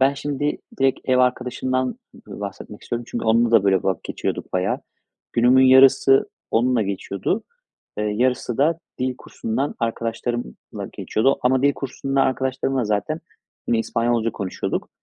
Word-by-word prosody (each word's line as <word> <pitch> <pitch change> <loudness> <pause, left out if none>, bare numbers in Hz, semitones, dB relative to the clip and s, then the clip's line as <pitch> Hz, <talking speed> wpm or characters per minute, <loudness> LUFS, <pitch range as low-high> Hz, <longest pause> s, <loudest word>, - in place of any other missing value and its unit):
ben 135 +2 +4
şimdi 145 +1 -2 0.2
direkt 135 -1 +2
ev 130 -1 +2
arkadaşımdan, 130 - 0 0.2
b 235 - -11
bahsetmek 100 +1 -7
istiyorum. 120 0 -4
Çünkü - - -4
onunla 115 +1 +3
da 115 -4 +5
böyle 95 -2 +3
vakit 95 - -1
geçiyorduk - - -4
bayağı. 95 +1 0 0.5
Günümün 125 +2 +5
yarısı 135 +1 +6 0.2
onunla 120 0 +2
geçiyordu. 100 - -2 0.6
Eee, 105 - 0
yarısı 120 +3 0
da 160 +4 +3 0.2
dil 130 0 -1
kursundan 130 +6 -3
arkadaşlarımla 115 - -4
geçiyordu 135 +6 +1
ama 130 +1 +3
dil 140 - +4
kursundan 135 +1 -2
arkadaşlarımla 130 0 -1
zaten 105 +10 -1 0.5
yine 115 - +3
İspanyolca 115 0 0
konuşuyorduk. 100 -4 -3
125 Hz, 135 wpm, -22 LUFS, 110-135 Hz, 0.6 s, yarısı